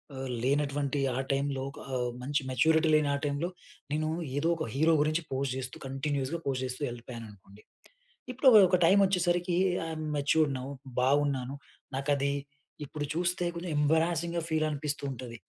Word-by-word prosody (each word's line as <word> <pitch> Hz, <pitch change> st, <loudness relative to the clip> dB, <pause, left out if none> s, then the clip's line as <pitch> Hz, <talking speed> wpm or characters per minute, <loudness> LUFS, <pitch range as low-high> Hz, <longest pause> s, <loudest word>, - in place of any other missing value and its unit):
ఆహ్, 130 Hz, 0 st, -5 dB
లేనటువంటి 140 Hz, 0 st, 0 dB, 0.2 s
ఆ -, -, -1 dB
టైంలో 135 Hz, -1 st, 0 dB, 0.3 s
ఆహ్, 125 Hz, -1 st, 0 dB
మంచి 145 Hz, +3 st, 0 dB
మెచ్యూరిటీ 160 Hz, +5 st, +3 dB
లేని 150 Hz, -1 st, +3 dB
ఆ -, -, -1 dB
టైంలో 145 Hz, +5 st, -1 dB, 0.4 s
నేను 155 Hz, +1 st, 0 dB, 0.3 s
ఏదో 160 Hz, +3 st, +1 dB
ఒక 160 Hz, -, -2 dB
హీరో 160 Hz, +4 st, +3 dB
గురించి 155 Hz, +2 st, +1 dB
పోస్ట్ 135 Hz, -1 st, -1 dB
జేస్తూ 125 Hz, -1 st, -5 dB
కంటిన్యూయస్‌గా 140 Hz, +3 st, -2 dB
పోస్ట్ 130 Hz, -2 st, -1 dB
జేస్తూ 130 Hz, +3 st, -5 dB
వెళ్ళిపోయాననుకోండి. 115 Hz, -4 st, -10 dB, 0.7 s
ఇప్పుడు 265 Hz, +2 st, +1 dB, 0.2 s
ఒక 185 Hz, -, +3 dB
టైమ్ 195 Hz, +4 st, +6 dB
వచ్చేసరికి 175 Hz, -1 st, +1 dB, 0.3 s
ఐయమ్ 155 Hz, -1 st, -4 dB
మెచ్యూర్డ్ 145 Hz, 0 st, +2 dB
నౌ 130 Hz, +1 st, -6 dB, 0.3 s
బావున్నాను. 135 Hz, 0 st, +1 dB, 0.4 s
నాకది 140 Hz, 0 st, +1 dB, 0.5 s
ఇప్పుడు 145 Hz, +1 st, -4 dB
జూస్తే 175 Hz, +1 st, 0 dB
కొంచెం 170 Hz, 0 st, -4 dB
ఎంబారసింగ్‌గా 165 Hz, +2 st, +1 dB
ఫీల్ 155 Hz, 0 st, +1 dB
అనిపిస్తూ 150 Hz, 0 st, -3 dB
ఉంటది. 120 Hz, -2 st, -7 dB
145 Hz, 145 wpm, -30 LUFS, 130-160 Hz, 0.7 s, టైమ్